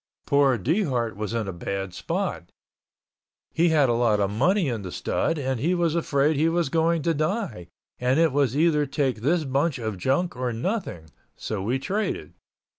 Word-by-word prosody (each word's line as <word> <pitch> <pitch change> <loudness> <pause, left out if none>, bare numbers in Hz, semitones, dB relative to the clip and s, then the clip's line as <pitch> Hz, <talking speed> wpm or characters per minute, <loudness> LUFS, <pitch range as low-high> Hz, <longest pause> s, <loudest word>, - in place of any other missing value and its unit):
Poor 140 -3 +3
Dehart 125 - 0
was 105 0 -4
in 110 -3 -1
a 95 - -4
bad 95 +2 -4
spot. - - -3 1.0
He 170 +1 +3
had 150 -4 +4
a 120 - +2
lot 115 -3 +2
of 100 -1 +1
money 175 - +2
in 115 -5 -2
the 95 -2 -7
stud 165 - -1
and 130 -3 -2
he 170 +8 +1
was 170 -3 +1
afraid 150 -2 +1
he 160 +3 +3
was 170 -3 0
going 165 0 +1
to 165 - +2
die 155 - -2 0.3
and 125 +4 +2
it 165 -2 +4
was 140 -2 +1
either 150 -2 +3
take 135 -3 0
this 160 +6 +2
bunch 140 +3 0
of 110 -5 -4
junk 135 - 0
or 125 -1 -2
nothing, 115 - -4 0.2
so 105 -3 -4
we 120 +7 0
traded. 200 +10 -3
140 Hz, 185 wpm, -25 LUFS, 115-165 Hz, 1.0 s, had